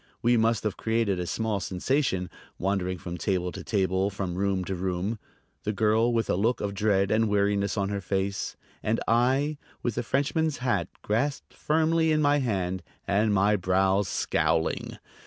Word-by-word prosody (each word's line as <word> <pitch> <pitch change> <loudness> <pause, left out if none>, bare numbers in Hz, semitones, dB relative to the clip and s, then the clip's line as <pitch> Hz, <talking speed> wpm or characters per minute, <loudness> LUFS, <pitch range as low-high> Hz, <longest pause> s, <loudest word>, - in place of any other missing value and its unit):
We 120 +1 +4
must 115 -1 +2
have 105 -3 -2
created 110 -4 0
a 90 - -3
small 110 0 -1
sensation, 95 - -1 0.3
wandering 95 -1 -1
from 85 0 -6
table 90 0 0
to - - -8
table, 95 -1 +1
from 95 -3 -4
room 95 0 0
to 95 - -3
room, 95 +4 -2 0.4
the 105 - -2
girl 110 +3 +3
with 115 -2 0
a - - +1
look 110 +6 +1
of 100 -1 -2
dread 100 -1 +2
and 110 0 +3
weariness 100 0 +1
on 100 -1 0
her 100 -1 -2
face, 95 0 -2 0.3
and 110 +2 0
I 135 +6 +2 0.2
with 120 - 0
the - - -1
Frenchman's 145 +5 0
hat 115 - 0 0.2
grasped 135 +7 -1
firmly 160 +1 +2
in 155 - +3
my 145 -1 +3
hand 95 -7 -1 0.3
and 105 +2 +2
my 100 +1 +3
brows 95 +1 +2
scowling. - - 0
105 Hz, 170 wpm, -27 LUFS, 95-115 Hz, 0.4 s, We